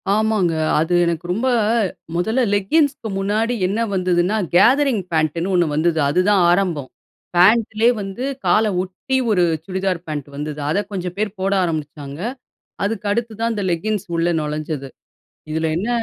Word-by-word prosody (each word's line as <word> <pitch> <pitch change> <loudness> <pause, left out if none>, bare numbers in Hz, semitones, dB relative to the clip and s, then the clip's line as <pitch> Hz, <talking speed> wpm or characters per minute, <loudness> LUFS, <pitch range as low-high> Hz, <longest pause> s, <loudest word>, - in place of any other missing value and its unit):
ஆமாங்க, 215 -5 +1 0.3
அது 160 +3 0
எனக்கு 170 0 -2
ரொம்ப 225 +8 0 0.7
மொதல்ல 220 +9 +1
லெக்கிங்ஸ்க்கு 265 +4 +1
முன்னாடி 215 +5 0
என்ன 200 +4 -1 0.2
வந்ததுன்னா? 185 +2 +1 0.2
கேதரிங் 255 0 +4
பேட்டுன்னு 165 +3 0
ஒண்ணு 175 -1 +4
வந்தது, 160 +1 +1
அது 150 - +1
தான் 200 -2 +4
ஆரம்பம். 175 -7 0 0.5
பேண்ட்லயே 220 +5 +4
வந்து 195 +5 -5 0.2
கால 220 - +4 0.2
ஒட்டி 190 +9 -3
ஒரு 180 -4 +3 0.2
சுடிதார் 190 -1 -1
பேண்ட் 150 -3 -4
வந்தது, 150 +1 -5
அத 160 - +1
கொஞ்சம் 180 -2 -4
பேர் 210 -1 -2
போட 195 +1 0
ஆரம்பிச்சாங்க. 150 -3 -4 0.6
அதுக்கு 210 +1 -2
அடுத்து 230 +1 -1
தான் 230 0 +1
அந்த 205 -2 -3
லெக்கிங்ஸ் 205 +4 -2
உள்ள 165 +1 +1
நுழைஞ்சது, 150 -2 -4 0.6
இதில 160 +1 0
என்ன 195 +7 -2
185 Hz, 140 wpm, -20 LUFS, 165-215 Hz, 0.7 s, கேதரிங்